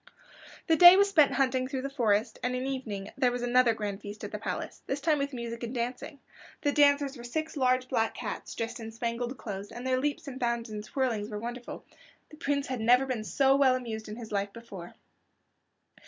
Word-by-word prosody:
The 325 - +4
day 350 +2 +10
was 400 0 +4
spent 310 -8 +5
in - - -4
hunting 260 -1 +1
through 260 0 -4
the 275 - -2
forest, 225 -4 +1
and 250 0 -1
in 250 - -2
the 270 - -2
evening 210 -7 -5
there 250 -2 +3
was 245 0 -3
another 245 -1 +4
grand 205 -2 -4
feast 205 +1 -9
at - - -5
the - - -5
palace, - - -5
this 270 - -2
time 305 0 +2
with 280 0 -1
music 235 -2 -6
and 240 +1 -5
dancing. 255 +5 -4 0.5
The 290 - +3
dancers 285 -1 +3
were 240 - -10
six 315 +7 -3
large 255 -2 +2
black 225 -2 0
cats 220 -4 -6
dressed 230 +1 -4
in 225 -1 -7
spangled 235 +2 -3
clothes, 200 -2 -6
and 240 +2 -8
their 255 0 +1
leaps 290 +2 -2
and 265 -1 -6
bounds 235 -2 -1
and 210 -1 -5
twirlings 225 -4 -1
were 210 - -5
wonderful. 240 +3 -7 0.5
The 305 - -12
Prince 285 -3 -1
had 255 -3 -4
never 245 +4 +5
been 250 -5 -3
so 270 +4 +3
well 270 -2 +4
amused 220 -4 -5
in 210 - -6
his 230 -2 -9
life 200 -1 -1
before. 200 -7 -10
250 Hz, 220 wpm, -29 LUFS, 225-275 Hz, 0.5 s, day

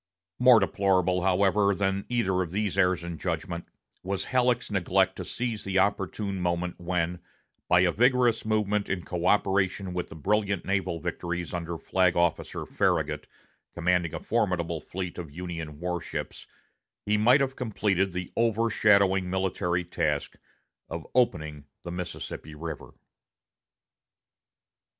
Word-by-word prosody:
More 125 -2 +8
deplorable, 95 -2 +2
however, 100 +2 +3
than 95 0 -1
either 95 -7 +1
of 90 - -2
these 100 +2 -1
errors 90 -2 +2
of 85 -2 -6
judgment 85 +1 -3 0.3
was 95 +1 -3
Halleck's 125 -2 +2
neglect 95 -4 +2
to - - -4
seize 115 -3 -3
the 95 0 -1
opportune 100 0 0
moment 85 0 -1
when, 90 0 -1 0.5
by 90 0 +5
a 90 -1 +4
vigorous 125 +2 +3
movement 105 -1 0
in 90 -3 -2
coöperation 95 +1 +1
with 90 -1 -3
the - - -10
brilliant 100 +3 0
naval 95 -3 -1
victories 85 +2 -4
under 85 -1 -3
Flag 90 +1 +2
Officer 85 -1 0
Farragut, - - 0 0.5
commanding 85 -1 +1
a - - -3
formidable 90 -7 0
fleet 90 -1 -5
of 85 -4 -6
Union 85 -3 -6
war 90 0 -2
ships, - - -6 0.6
he 105 - +2
might 120 +6 +5
have 135 -1 0
completed 100 -5 0
the 90 0 -5
over 115 0 +2
shadowing 100 -3 +4
military 90 -1 0
task 75 -4 -1 0.5
of - - -5
opening 75 - 0 0.2
the 85 - -6
Mississippi 85 -3 -6
River. 80 -1 -7
95 Hz, 135 wpm, -27 LUFS, 85-105 Hz, 0.6 s, More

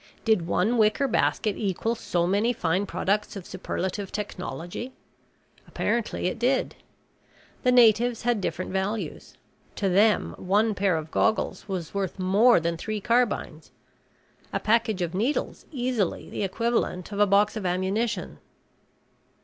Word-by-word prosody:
Did 215 -7 +2
one 210 +8 +1
wicker 220 +6 +3
basket 215 -3 +1
equal 210 +2 -1
so 175 -6 -1
many 205 +6 +2
fine 185 0 0
products 205 +3 -1
of 195 -3 -7
superlative 190 +1 -4
technology? 185 - -5 0.7
Apparently 235 -5 -1
it 180 - -1
did. 260 +3 +1 0.9
The 250 - +3
natives 240 -1 +4
had 240 -3 +1
different 185 0 -3
values. 195 +3 -3 0.4
To 195 - 0
them, 205 +4 +3
one 210 +4 +2
pair 195 -4 +1
of 160 0 -6
goggles 220 -3 0
was 185 -5 -4
worth 195 -2 -2
more 195 +5 +4
than 170 0 -2
three 215 +5 -3
carbines, 230 -8 0 0.8
a - - -1
package 220 -4 +1
of 170 0 -3
needles 230 +10 -2
easily 245 - -2
the - - -4
equivalent 205 -2 -1
of 200 - -4
a 205 - +5
box 205 +2 +3
of 215 - -4
ammunition. 190 +6 -1
205 Hz, 135 wpm, -26 LUFS, 185-230 Hz, 0.9 s, a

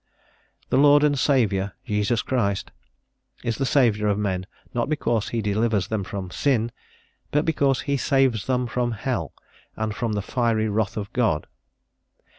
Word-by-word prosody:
"The 130 - +4
Lord 145 +1 +6
and 150 -1 +4
Saviour, 105 -9 +2
Jesus 105 0 0
Christ" 100 -7 -1 0.7
is 115 -2 -1
the 135 - +1
Saviour 110 -6 +3
of 100 - +1
men, 95 -3 -2 0.3
not 120 +4 -1
because 120 -8 0
he 115 -2 -2
delivers 105 -1 +1
them 110 -3 -1
from 95 -1 -6
sin, 120 -3 +1 0.6
but 150 +1 +1
"because 140 -5 +2
he 140 0 -1
saves 135 -5 +2
them 125 -1 +1
from 120 0 -1
hell, 120 +3 -2 0.4
and 110 -1 -2
from 115 -1 -2
the 105 -1 -2
fiery 115 -1 0
wrath 105 0 -1
of 100 -1 -5
God." 110 -12 +1
115 Hz, 155 wpm, -24 LUFS, 105-130 Hz, 0.7 s, Lord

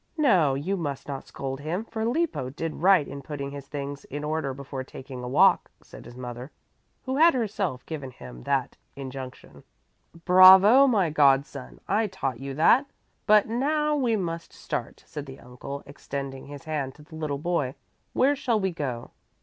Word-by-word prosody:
"No, 185 - +4
you 180 +9 -2
must 145 -6 -4
not 140 -2 -6
scold 135 0 -5
him, 170 +9 -3
for 220 -1 -4
Lippo 250 - -1
did 155 +4 -5
right 185 -4 +5
in 140 0 -7
putting 140 -1 -6
his 140 -1 -9
things 140 -1 -6
in 145 +2 -6
order 155 -2 -2
before 135 0 -6
taking 130 -1 -9
a - - -4
walk," 125 - +4
said - - -13
his 120 +1 -12
mother, 125 +1 -7 0.6
who 260 +1 -2
had 330 0 +6
herself 200 - -2
given 145 -5 -6
him 65 - -11
that - - -1 0.2
injunction. 130 -1 -9 0.6
"Bravo, 190 +8 +8
my 200 - +2
god 140 -2 +4
son! 65 - -11
I 215 +2 +1
taught 135 - -4
you 135 0 -6
that, 240 - +4 0.4
but 210 -1 +5
now 300 +6 0
we 250 -6 +1
must 170 -4 -4
start," - - -5
said 145 -1 -7
the 135 0 -10
uncle, 125 +3 -8
extending 140 -1 -7
his 145 +1 -9
hand 150 -5 -3
to 150 - -15
the 160 - -18
little 155 -3 -3
boy. 150 -4 -1 0.4
"Where 280 +3 +3
shall 235 -5 0
we 190 -2 0
go?" 130 -8 -5
150 Hz, 175 wpm, -26 LUFS, 135-195 Hz, 0.6 s, Bravo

